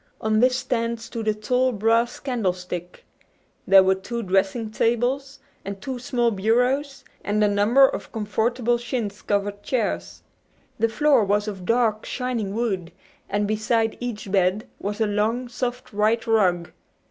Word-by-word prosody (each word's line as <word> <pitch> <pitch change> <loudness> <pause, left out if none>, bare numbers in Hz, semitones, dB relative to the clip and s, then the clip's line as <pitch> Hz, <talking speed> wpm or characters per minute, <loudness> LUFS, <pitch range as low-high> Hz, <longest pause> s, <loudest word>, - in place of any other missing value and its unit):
On 215 0 +1
this 255 +2 +4
stand 230 -2 -1
stood 225 -1 -6
a 215 - +3
tall 250 +4 +1
brass 230 +2 +1
candlestick. 180 -8 -3 0.6
There 195 -1 +8
were 190 0 +4
two 230 +5 -5
dressing 195 +4 0
tables, 250 +5 0 0.3
and 195 0 -6
two 260 +3 -5
small 240 -1 0
bureaus, 250 +7 0 0.2
and 210 +1 +1
a - - +5
number 210 +7 +5
of - - -6
comfortable 230 +3 0
chintz 235 -4 -4
covered 205 0 -1
chairs. 90 - -2 0.6
The 230 +1 +2
floor 280 -1 +3
was 205 +1 +1
of 190 -4 -6
dark, 230 -2 +2
shining 235 -6 -3
wood, 195 -7 -2 0.4
and 205 +1 0
beside 220 +1 0
each 225 -5 -5
bed 190 +2 +1
was 205 +2 -4
a 220 - +3
long, 215 +4 0
soft 245 0 -4
white 215 +2 +1
rug. 185 -6 +2
220 Hz, 145 wpm, -24 LUFS, 205-240 Hz, 0.6 s, There